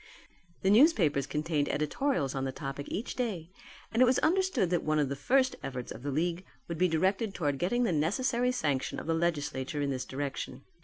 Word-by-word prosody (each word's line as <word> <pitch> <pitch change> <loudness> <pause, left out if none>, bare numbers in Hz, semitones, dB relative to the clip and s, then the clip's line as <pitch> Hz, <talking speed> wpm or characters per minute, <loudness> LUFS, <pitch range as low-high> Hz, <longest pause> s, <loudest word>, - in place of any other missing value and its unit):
The 190 - +4
newspapers 195 - +4
contained 150 -1 -1
editorials 150 - 0
on 135 -1 -2
the 135 - -1
topic 135 +1 -6
each 220 - -4
day 190 -9 -3 0.4
and 230 - +1
it - - +9
was 255 +1 +3
understood 330 - +2
that 175 - +2
one 155 0 0
of 145 -3 +1
the 140 - -2
first 260 - +2
efforts 125 -2 -5
of - - -8
the 145 - -3
league 170 +5 -1 0.2
would 170 -2 -5
be 185 - +4
directed 190 +5 0
towards 145 -5 -1
getting 240 +8 +1
the 225 - +1
necessary 235 - +1
sanction 145 - -1
of - - -8
the 165 - +1
legislature 150 -4 -1
in 140 - 0
this 130 -1 -3
direction. 135 0 -5
165 Hz, 200 wpm, -30 LUFS, 145-225 Hz, 0.4 s, it